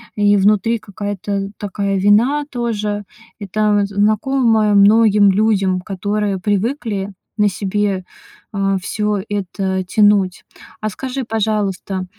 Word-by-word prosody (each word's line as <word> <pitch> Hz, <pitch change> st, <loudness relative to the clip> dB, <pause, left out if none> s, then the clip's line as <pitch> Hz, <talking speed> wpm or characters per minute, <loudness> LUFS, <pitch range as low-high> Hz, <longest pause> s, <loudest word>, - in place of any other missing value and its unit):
и 205 Hz, 0 st, +3 dB
внутри 210 Hz, +3 st, +2 dB
какая-то 200 Hz, -1 st, -4 dB
такая 200 Hz, -1 st, -2 dB
вина 235 Hz, +9 st, +3 dB
тоже. 215 Hz, -5 st, -3 dB, 0.4 s
Это 205 Hz, +1 st, +1 dB
знакомое 215 Hz, +2 st, +2 dB
многим 205 Hz, 0 st, +5 dB
людям, 195 Hz, -2 st, +1 dB
которые 200 Hz, +1 st, -2 dB
привыкли 205 Hz, 0 st, -2 dB, 0.2 s
на 210 Hz, -1 st, +3 dB
себе, 195 Hz, 0 st, -1 dB, 0.5 s
э, 195 Hz, -1 st, 0 dB
всё 210 Hz, +1 st, -1 dB
это 190 Hz, -1 st, -2 dB
тянуть. 200 Hz, -1 st, +2 dB, 0.4 s
А 215 Hz, -, -1 dB
скажи, 265 Hz, +5 st, -5 dB
пожалуйста, 205 Hz, -4 st, -2 dB
205 Hz, 105 wpm, -18 LUFS, 195-215 Hz, 0.5 s, многим